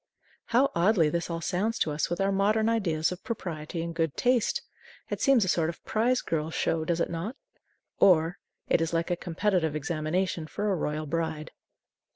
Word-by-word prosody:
How 255 +4 +3
oddly 170 -2 +3
this 170 +3 -2
all 165 0 -3
sounds 200 +6 -1
to 155 - 0
us 150 +1 -1
with 175 - -2
our 195 0 +2
modern 210 +3 +2
ideas 180 -9 +1
of 180 0 -7
propriety 165 -7 -4
and 170 0 -4
good 165 -3 -1
taste! 245 -2 +2 0.5
It - - -3
seems 265 -7 +4
a - - -4
sort 165 -2 +2
of 170 - -9
Prize 245 +4 +1
Girl 155 -1 -2
Show, 165 0 0
does 170 +1 -1
it - - 0
not? 180 +9 -4 0.6
Or, 170 -1 +4 0.3
it - - +3
is 165 0 -1
like 165 +2 0
a - - +2
competitive 175 -2 0
examination 155 +2 -1
for 210 +5 -2
a - - +2
royal 155 -2 -2
bride. 160 0 -3
170 Hz, 190 wpm, -28 LUFS, 160-200 Hz, 0.6 s, seems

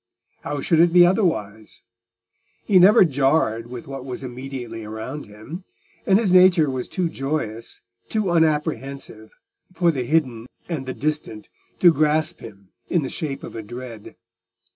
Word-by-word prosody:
How 145 -1 -4
should 165 +2 +2
it 170 0 +5
be 175 0 +7
otherwise? 110 - -1 0.8
He 190 -3 +5
never 190 +1 +7
jarred 135 -6 +1
with 120 0 -8
what 135 -1 -7
was 130 0 -7
immediately 125 -3 -7
around 110 +7 -7
him, 110 - -10 0.4
and 195 - +5
his 205 -5 +1
nature 180 -5 +5
was 130 -1 -4
too 180 -2 -1
joyous, 135 -7 -4 0.3
too 215 -5 -1
unapprehensive, 145 -8 -1 0.4
for 175 -2 +2
the 135 -5 -3
hidden 125 -5 0 0.2
and 150 -7 -4
the 130 - -4
distant 145 -7 -4 0.3
to 175 -2 +7
grasp 155 +1 +1
him 100 -4 -13 0.2
in 170 -4 +1
the 130 - -4
shape 145 -4 -5
of - - -9
a 115 - -5
dread. 120 0 -10
140 Hz, 150 wpm, -22 LUFS, 115-165 Hz, 0.8 s, be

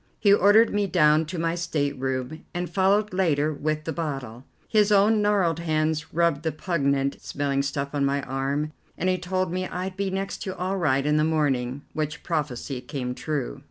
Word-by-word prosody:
He 200 -2 +5
ordered 205 +3 +5
me 205 -1 +1
down 155 -3 +4
to 175 +3 -5
my 165 0 0
stateroom, 140 -4 -2
and 175 0 -2
followed 195 +3 +2
later 155 -5 +1
with 155 +1 -2
the 160 - -3
bottle. 135 -7 -5 0.2
His 210 -1 +3
own 210 +2 +5
gnarled 195 -6 +2
hands 155 -2 -1
rubbed 170 -3 +2
the 160 0 -1
pungent 140 -4 0
smelling 140 -1 -1
stuff 140 0 -3
on 145 -1 0
my 140 0 +1
arm, 135 +3 -2 0.3
and 185 - 0
he 185 0 +1
told 185 0 -1
me 185 0 -2
I'd 185 +1 -4
be 200 0 -1
next 195 +1 -3
to 190 -1 -5
all 185 +2 -1
right 140 -6 +1
in 150 0 +2
the 155 - +3
morning, 140 -4 0
which 155 0 -3
prophecy 140 -5 -3
came 125 -3 -4
true. 135 - -3
155 Hz, 185 wpm, -25 LUFS, 140-185 Hz, 0.3 s, He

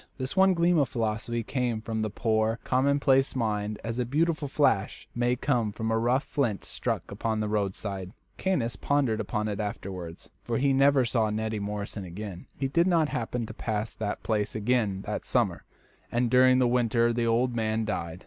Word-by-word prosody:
This 130 +3 -4
one 190 -1 +5
gleam 170 0 +3
of 140 - +2
philosophy 115 0 -2
came 120 -2 -1
from 110 0 -3
the 110 - -1
poor, 110 +1 +1
commonplace 135 +1 +2
mind 105 -3 -1
as 115 +1 -3
a - - +2
beautiful 155 +4 0
flash 135 -8 +1
may 120 +1 +1
come 120 -4 0
from 110 +2 -3
a 110 - +2
rough 125 +4 +2
flint 120 -9 -1
struck - - -3
upon 110 -1 -2
the 105 - -1
roadside. 100 -2 -2 0.3
Caius 125 - 0
pondered 130 0 +1
upon 105 -1 -2
it 105 -1 -3
afterwards, 95 -5 -6
for 115 -1 -1
he 135 +1 +2
never 135 -1 +4
saw 115 -2 +1
Neddy 110 0 -2
Morrison 100 0 -4
again. 90 +1 -7
He 135 - 0
did 170 +6 +2
not 165 -4 +3
happen 120 0 -2
to - - -8
pass 110 0 -3
that 105 -2 -4
place 105 -2 -1
again 110 -3 0
that - - -3
summer, - - 0 0.5
and 120 0 +1
during 130 0 +6
the 130 -1 +4
winter 120 -1 +2
the 115 0 0
old 120 +2 +2
man 110 -1 0
died. 85 -4 -3
115 Hz, 185 wpm, -28 LUFS, 105-130 Hz, 0.5 s, during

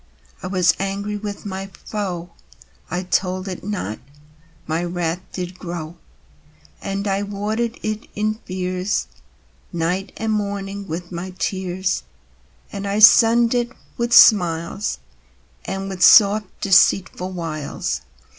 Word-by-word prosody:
I - - -5
was 180 -3 +3
angry 200 +2 -2
with 205 -1 -6
my 195 0 -5 0.2
foe: 180 -5 -4 0.6
I 180 +2 -2
told 185 +1 -1
it 185 -2 -6
not, 185 - -4 0.7
my 160 +2 -1
wrath 175 -1 -2
did 180 0 -6
grow. 170 -2 -6 0.9
And 195 +1 -3
I 195 0 0
watered 215 +3 -2
it 215 +1 -3
in 215 +1 -1
fears 185 +2 -2 0.7
Night 180 +3 -1
and 225 0 -1
morning 200 -1 -3
with 175 +2 -5
my 180 +1 -6
tears, 185 -1 -1 0.7
And 200 0 -5
I 200 +1 -1
sunned 230 +2 +7
it 240 0 0 0.2
with 235 0 -2
smiles 185 -5 +5 0.7
And 195 0 -4
with 190 -2 -6
soft 210 -1 +7
deceitful 185 -1 +3
wiles. 160 -4 -3
195 Hz, 120 wpm, -21 LUFS, 180-205 Hz, 0.9 s, sunned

